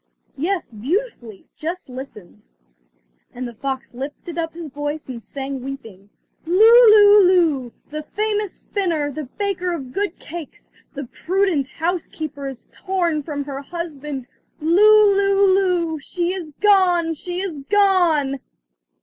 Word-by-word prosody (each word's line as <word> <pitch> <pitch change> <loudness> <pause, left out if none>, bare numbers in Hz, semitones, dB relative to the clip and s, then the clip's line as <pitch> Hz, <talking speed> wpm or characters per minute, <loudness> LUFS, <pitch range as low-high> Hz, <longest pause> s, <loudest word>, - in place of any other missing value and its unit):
"Yes, 340 0 -2
beautifully, 240 - -4
just 340 +4 -5
listen," 250 -7 -10 0.9
and 250 +1 -4
the 240 - -9
fox 265 +3 -5
lifted 285 +6 -7
up 325 -1 -3
his 335 -2 -7
voice 290 +2 -5
and 245 -3 -7
sang 270 +1 -6
weeping: 225 -8 -9 0.4
"Lou, 350 +2 +1 0.3
lou, 415 -1 +8
lou! 325 -10 +2 0.2
the 305 0 -4
famous 420 +3 -2
spinner, 330 -8 -2
the 305 +1 -6
baker 365 +4 -3
of 265 -6 -6
good 405 -3 -2
cakes, 335 -2 -10 0.2
the 280 0 -5
prudent 350 0 0
housekeeper 315 -2 -4
is 265 -3 -9
torn 345 -5 -1
from 285 -1 -4
her 275 -1 -6
husband! 295 -5 -6 0.3
Lou, 410 +5 +5
lou, 395 -1 +3
lou! 355 -5 +1
she 350 +5 -2
is 360 -5 -6
gone! 365 -5 +4
she 355 +3 -4
is 365 -6 -4
gone!" 350 -9 +3
325 Hz, 130 wpm, -21 LUFS, 275-375 Hz, 0.9 s, lou